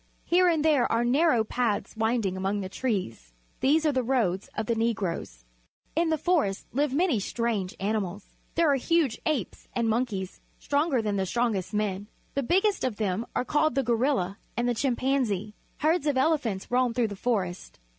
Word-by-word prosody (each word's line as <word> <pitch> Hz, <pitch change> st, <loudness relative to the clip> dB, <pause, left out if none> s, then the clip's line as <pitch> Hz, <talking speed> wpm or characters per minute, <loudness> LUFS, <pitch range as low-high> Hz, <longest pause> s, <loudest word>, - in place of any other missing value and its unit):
Here 360 Hz, +1 st, +4 dB
and 320 Hz, -3 st, +2 dB
there 295 Hz, -6 st, +3 dB
are 230 Hz, +1 st, +2 dB
narrow 255 Hz, -2 st, +3 dB
paths 225 Hz, -1 st, -1 dB
winding 220 Hz, -3 st, 0 dB
among 195 Hz, +2 st, -1 dB
the 190 Hz, -, -5 dB
trees. 185 Hz, -, -3 dB, 0.3 s
These 305 Hz, +4 st, +3 dB
are 305 Hz, -, +4 dB
the 260 Hz, -2 st, +1 dB
roads 225 Hz, -7 st, 0 dB
of 220 Hz, -, -2 dB
the 235 Hz, -, +1 dB
Negroes. 200 Hz, -, -2 dB, 0.5 s
In 330 Hz, +1 st, +2 dB
the 315 Hz, -, +2 dB
forests 305 Hz, -, 0 dB
live 285 Hz, +2 st, +1 dB
many 300 Hz, -, +2 dB
strange 210 Hz, -3 st, -2 dB
animals. 200 Hz, -1 st, -2 dB, 0.3 s
There 330 Hz, -3 st, +4 dB
are 275 Hz, -, +3 dB
huge 310 Hz, -2 st, +1 dB
apes 285 Hz, -, -2 dB
and 235 Hz, -1 st, 0 dB
monkeys, 220 Hz, -5 st, -2 dB, 0.2 s
stronger 285 Hz, -4 st, +1 dB
than 205 Hz, -2 st, -1 dB
the 190 Hz, -1 st, 0 dB
strongest 225 Hz, -4 st, 0 dB
men. 205 Hz, -1 st, -1 dB, 0.3 s
The 280 Hz, -, 0 dB
biggest 385 Hz, -, +2 dB
of 255 Hz, -4 st, 0 dB
them 205 Hz, +1 st, -2 dB
are -, -, 0 dB
called 300 Hz, +3 st, +1 dB
the 270 Hz, -, +2 dB
gorilla 230 Hz, -5 st, 0 dB, 0.2 s
and 240 Hz, +1 st, +1 dB
the 245 Hz, -, +2 dB
chim 245 Hz, +2 st, 0 dB
panzee. 230 Hz, -7 st, 0 dB, 0.3 s
Herds 310 Hz, 0 st, +2 dB
of 285 Hz, -3 st, +1 dB
ele 310 Hz, +4 st, +3 dB
phants 210 Hz, -7 st, -4 dB
roam 250 Hz, -1 st, +2 dB
through 240 Hz, -3 st, +1 dB
the 205 Hz, -, -6 dB
forest. 190 Hz, -, -2 dB
235 Hz, 185 wpm, -27 LUFS, 205-280 Hz, 0.5 s, Here